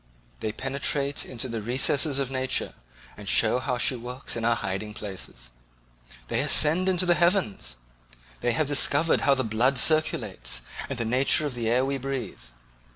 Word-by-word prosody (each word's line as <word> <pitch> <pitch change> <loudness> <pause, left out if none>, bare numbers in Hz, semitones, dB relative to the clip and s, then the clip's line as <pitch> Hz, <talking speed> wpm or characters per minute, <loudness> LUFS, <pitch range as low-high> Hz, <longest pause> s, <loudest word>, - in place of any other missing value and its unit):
They 105 - -3
penetrate 140 +3 -1
into 130 0 -4
the 115 -2 -5
recesses 130 +5 +1
of 135 -2 -2
nature 130 0 -2 0.4
and - - -6
show 125 - +4
how 125 -1 -2
she 125 - +2
works 125 +2 -4
in 115 - -4
her 120 +1 +2
hiding 105 0 -4
places. 95 - -8 0.8
They - - -1
ascend 165 +5 +4
into 185 -1 +2
the 175 - +4
heavens; 170 - 0 0.6
they 120 - 0
have 155 - 0
discovered 145 +2 +3
how 140 - +3
the 130 - -1
blood 120 +4 +1
circulates, 60 - +1 0.3
and 135 - -4
the 115 - -2
nature 130 +6 +2
of 145 - -3
the 115 -2 -3
air 125 +3 +2
we 135 0 -3
breathe. 130 - -5
130 Hz, 165 wpm, -25 LUFS, 115-140 Hz, 0.8 s, show